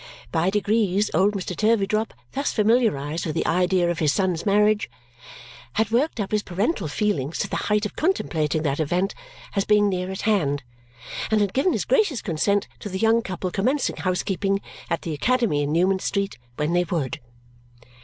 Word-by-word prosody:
By 170 +2 +2
degrees, 210 -1 +1
old 195 +5 +3
Mr. 185 -2 -4
Turveydrop, 215 +1 +1 0.2
thus 280 +2 -1
familiarized 205 - +1
with 155 - -3
the 165 - 0
idea 180 0 +2
of 170 - -4
his 150 -3 +3
son's 185 +1 0
marriage, 210 - +3 0.8
had 220 0 0
worked 255 +3 +1
up 200 - -2
his 210 -1 +2
parental 195 - -1
feelings 155 -3 -1
to - - -1
the - - -4
height 210 0 +2
of 210 - -5
contemplating 160 - 0
that 140 -1 -1
event 175 +6 0 0.4
as 195 - +2
being 210 0 +4
near 185 -1 -2
at 190 - -4
hand 150 -10 +1 0.7
and 220 - +3
had 205 -2 +1
given 280 +7 +2
his - - -1
gracious 420 - +2
consent 200 +4 +1
to 205 - -6
the 190 - -3
young 225 +3 +3
couple 185 -3 -4
commencing 250 +10 0
housekeeping 195 +1 0 0.3
at 170 - -1
the 165 - -3
academy 230 - +1
in 145 0 -1
Newman 185 +4 +2
Street 200 -5 -2 0.2
when 150 +5 -1
they 175 0 +3
would. 155 -7 -2
195 Hz, 175 wpm, -24 LUFS, 170-215 Hz, 0.8 s, being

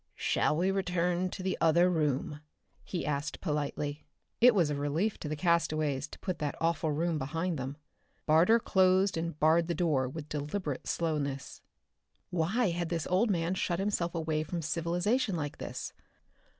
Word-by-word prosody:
"Shall 150 - +1
we 185 +3 +2
return 180 -1 0
to 185 - -7
the 190 - 0
other 170 +2 +5
room?" 150 -4 0 0.4
he 180 - -4
asked 150 +2 -2
politely. 150 -2 -3 0.3
It 245 -1 +7
was 170 -6 +3
a - - -1
relief 150 +9 -1
to 150 - -5
the 155 - -2
castaways 155 -4 +1
to - - -11
put 185 -3 -4
that 150 -2 -2
awful 165 -1 +1
room 160 +1 0
behind 165 +3 -2
them. 135 +2 -5 0.5
Barter 165 +9 +5
closed 190 -2 +3
and 165 -2 -3
barred 160 +2 +4
the 170 - -1
door 150 -7 +1
with 150 +2 -7
deliberate 150 -1 -4
slowness. 145 -5 -2 0.7
Why 185 +7 +1
had 170 0 -2
this 165 -2 -2
old 205 +6 +3
man 170 -2 +1
shut 180 -2 -1
himself 185 -3 -1
away 160 -2 0
from 165 +2 -4
civilization 175 - 0
like 145 -3 -4
this? - - -5
165 Hz, 165 wpm, -31 LUFS, 150-180 Hz, 0.7 s, It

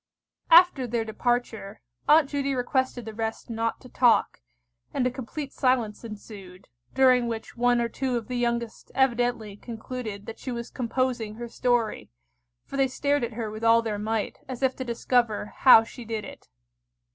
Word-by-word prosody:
After 330 -6 +6
their 230 -1 -1
departure, 225 -2 -2 0.3
Aunt 305 -1 +6
Judy 275 -1 -1
requested 255 -1 -1
the 220 - -7
rest 225 +1 -4
not 225 0 -2
to 255 - -12
talk, 245 -2 +2 0.5
and 250 - +1
a 250 - +1
complete 270 +3 -6
silence 245 -5 0
ensued, 200 -4 -11 0.3
during 255 -2 +5
which 225 -1 -5
one 245 0 +2
or 235 - +1
two 255 +1 -2
of 230 - -6
the 250 - -4
youngest 235 -1 -2
evidently 245 -5 +1
concluded 225 -2 -7
that 225 - -8
she 260 - -5
was 235 -1 -5
composing 245 -3 -2
her 240 +1 -6
story, 235 - -1 0.6
for 275 - -6
they 270 -1 +3
stared 285 +1 0
at 235 0 -3
her 220 -1 -4
with 215 +1 -8
all 230 0 +5
their 215 -2 -3
might, 215 0 -2
as 255 0 -5
if 260 -1 +2
to 260 - -3
discover 235 -3 0
how 240 -4 +8
she 240 +2 -10
did 225 -2 -4
it. - - -12
235 Hz, 170 wpm, -26 LUFS, 225-255 Hz, 0.6 s, how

